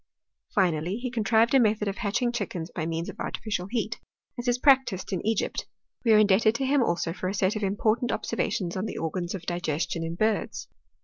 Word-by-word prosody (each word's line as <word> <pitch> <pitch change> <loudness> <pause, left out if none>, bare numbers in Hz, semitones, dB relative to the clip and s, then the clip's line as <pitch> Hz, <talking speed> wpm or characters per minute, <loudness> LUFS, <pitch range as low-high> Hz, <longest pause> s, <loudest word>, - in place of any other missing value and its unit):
■ - - -30
Finally, 180 0 +1
he 250 0 -4
contrived 225 +1 +3
a 270 - +7
method 215 -2 +2
of 195 - -2
hatching 235 +3 0
chickens 185 -7 -4
by 160 -2 -3
means 165 +1 -2
of - - -8
artificial 205 -5 -3
heat, 225 -1 -2 0.4
as 240 - -4
is 245 0 +3
practised 260 -9 +3
in 185 - -2
Egypt. 220 -1 -1 0.4
We 230 - +3
are 215 - +7
indebted 215 +1 +4
to 270 - -1
him 280 +1 +3
also 170 -5 0
for 185 - -4
a 195 - -3
set 190 +1 +1
of 215 - -3
important 215 +4 +1
observations 185 -6 -2
on 190 +3 -2
the - - -5
organs 175 +3 -3
of 180 - -8
digestion 170 -1 -2
iu 165 0 -3
birds. 215 +3 -1
205 Hz, 205 wpm, -27 LUFS, 180-230 Hz, 0.4 s, a